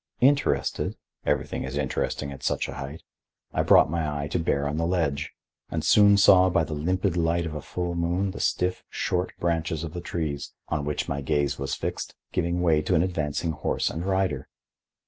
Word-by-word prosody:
Interested—everything 140 +2 0
is 65 +2 -4
interesting 70 0 -2
at 70 - -9
such - - 0
a - - -6
height—I 70 +4 -7
brought - - +6
my 75 -3 -1
eye - - -3
to - - 0
bear 70 -3 0
on 75 +2 -2
the 80 +1 +1
ledge, 80 -4 0 0.4
and - - -2
soon 100 -1 +6
saw 95 -2 +7
by 85 - +2
the 80 - -4
limpid 90 +4 0
light 85 0 +1
of 80 - -4
a 75 - -4
full 90 +3 -3
moon 85 +3 0
the - - -8
stiff, 90 0 0
short 90 0 -1
branches 80 -2 -1
of 80 -1 -5
the 90 - -5
trees, 80 -5 -4
on 75 -2 -1
which 75 0 -2
my 70 - -2
gaze 70 0 0
was 70 -1 -2
fixed, - - -4 0.2
give 85 -1 0
way 85 -3 +3
to - - +1
an 80 - +4
advancing 80 -2 -1
horse - - -1
and 80 - -4
rider. 95 -8 0
80 Hz, 185 wpm, -26 LUFS, 75-90 Hz, 0.4 s, saw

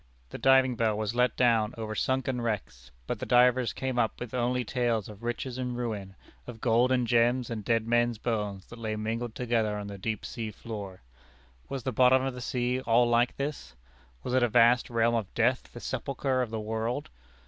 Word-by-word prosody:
The - - -7
diving 130 -1 +4
bell 110 -2 +1
was 110 0 -2
let 125 +1 +1
down 115 -3 +3
over 110 -1 -4
sunken 130 +2 -1
wrecks, 80 - -4 0.2
but - - -3
the - - -4
divers 125 -1 +4
came 130 -2 -2
up 115 -2 0
only 125 0 0
with 120 - -7
tales 120 -5 0
of 105 0 -11
riches 120 +2 -4
and 125 -1 -3
ruin, 105 -6 -4 0.3
of 120 -2 -8
gold 120 +2 +3
and 125 -1 +2
gems 120 +1 +2
and 110 -2 -4
dead 115 +1 +1
men's 120 0 +2
bones 105 -4 -3
that 120 - -10
lay 110 -1 -3
mingled 115 +2 -3
together 115 -4 0
on 105 - -5
the 100 -1 -8
deep 110 +1 -3
sea 115 -2 -5
floor. 100 - -8 0.7
Was 135 -2 -4
the 130 - -1
bottom 130 +2 +4
of 135 -1 -2
the 125 - -8
sea 125 +1 -1
all 120 0 +3
like 120 +1 +2
this? 140 - -5 0.5
Was 125 - -3
it 130 - +4
a 120 - +3
vast 120 +2 +4
realm 115 0 +2
of 110 -5 -1
death, 120 +2 +1
the 120 - -9
sepulchre 130 +1 -2
of 125 - -2
the 110 0 -3
world? 110 - -3
120 Hz, 205 wpm, -28 LUFS, 110-125 Hz, 0.7 s, diving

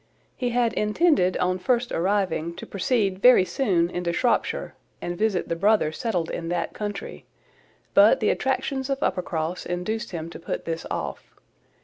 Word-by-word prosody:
He 245 - -1
had 240 -1 +1
intended, 210 - +2
on 185 +1 0
first 245 +3 0
arriving, 180 -3 0
to - - -8
proceed 195 -2 0
very 245 -4 +7
soon 185 -9 +1
into 175 -1 -2
Shropshire, 240 +8 0 0.3
and 175 - -4
visit 205 -1 0
the 170 - -1
brother 200 -2 +3
settled 175 -3 -2
in 165 -1 -4
that 175 -1 -2
country, 205 -1 -6 0.7
but - - +6
the - - +2
attractions 265 -1 -1
of 275 +1 -1
Uppercross 175 -1 -2
induced 215 +6 -3
him 165 -3 -5
to - - -9
put 165 - -5
this 165 0 -4
off. - - -5
190 Hz, 155 wpm, -25 LUFS, 175-235 Hz, 0.7 s, very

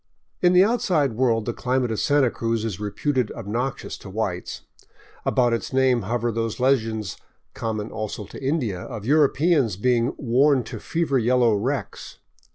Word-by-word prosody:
In 180 0 +4
the 180 +1 +7
outside 180 - +1
world 115 -2 +1
the 120 - -2
climate 125 -1 -1
of 110 - -2
Santa 145 -4 +3
Cruz 115 -1 -2
is 100 -6 -4
reputed 115 +4 -1
obnoxious 120 +6 -4
to 100 - -10
whites; 95 -3 -3 0.6
about 120 -2 +2
its 115 - -3
name 130 -2 +3
hover 120 +3 -1
those 115 0 -3
legends, 115 -7 0 0.4
common 110 -1 -4
also 110 -1 -5
to 135 - -11
India, 130 - -1
of 110 +1 -7
Europeans 145 - +3
being 120 +3 +1
worn 135 +1 +3
to - - -7
fever 165 -5 0
yellow 120 -1 +3
wrecks. 130 +7 -3
120 Hz, 155 wpm, -23 LUFS, 110-135 Hz, 0.6 s, the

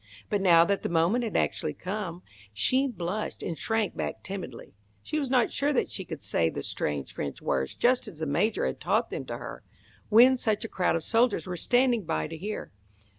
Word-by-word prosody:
But 205 -2 +1
now 170 -3 +6
that 200 +2 0
the - - -2
moment 170 +9 +2
had 225 - -1
actually 150 -1 -1
come, 185 -1 -5 0.3
she 255 - +3
blushed 200 -2 -4
and 170 - -3
shrank 225 +3 0
back, - - -4
timidly. 185 -11 -7 0.3
She 305 - -2
was 275 -3 -2
not 250 -3 +3
sure 285 +1 +1
that 260 - 0
she 190 - -5
could 160 -5 -7
say 80 - +1
the - - -5
strange 70 -2 -2
French 70 -1 -4
words 65 -1 -1
just 250 -1 +2
as 190 -7 -9
the 160 - -3
Major 170 +10 +1
had - - -2
taught - - +1
them - - -4
to - - -5
her, - - -8 0.5
when 245 +4 +7
such 215 -3 0
a - - -3
crowd 185 -5 +1
of 165 - -1
soldiers 230 +3 +2
were 180 -1 -4
standing 245 +3 +2
by 160 - -1
to 160 - -6
hear. 205 +7 -5
195 Hz, 210 wpm, -28 LUFS, 165-235 Hz, 0.5 s, when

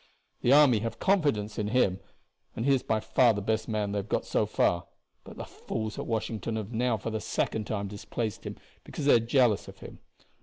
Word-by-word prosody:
The 120 - +2
army 140 -6 +6
have 115 +1 -4
confidence 145 - +1
in 105 - -1
him, 105 -5 +2 0.6
and 115 - -3
he 140 - +4
is 130 - +2
by 110 -1 0
far 120 +1 +3
the 105 - -3
best 110 +1 -1
man 105 -2 -1
they 100 - -1
have 100 - -7
got - - 0
so - - 0
far, 85 -1 +1 0.4
but - - -12
the - - -5
fools 110 -1 -5
at - - -5
Washington 110 -1 -2
have 110 +1 -5
now 120 0 +1
for 115 +3 -5
the 110 -1 -3
second 110 +1 -2
time 100 -2 -2
displaced 105 +2 -5
him - - -6 0.3
because 145 - -6
they 145 - +6
are 120 - +6
jealous 115 -2 +2
of - - -11
him. - - -11
110 Hz, 220 wpm, -28 LUFS, 105-120 Hz, 0.6 s, army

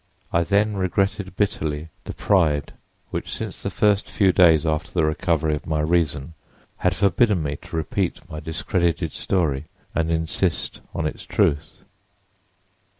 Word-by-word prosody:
I 85 - +4
then 100 +3 +2
regretted 95 +1 0
bitterly 80 -6 -1 0.2
the - - -6
pride 80 -8 +2 0.4
which - - -4
since - - -5
the - - -2
first 105 -1 +2
few 95 -3 +3
days 85 -4 +5
after 75 -1 -1
the 85 -3 +2
recovery 80 0 +1
of 75 - -4
my 80 -1 0
reason 80 -2 0 0.4
had 90 0 +1
forbidden 100 0 +3
me 70 -1 -2
to - - -10
repeat 80 - -2
my 75 - -6
discredited 85 +2 -1
story 80 -7 0 0.3
and 80 -1 0
insist 80 -2 -1
upon - - -5
its - - -4
truth. 75 - 0
85 Hz, 145 wpm, -23 LUFS, 75-95 Hz, 0.4 s, days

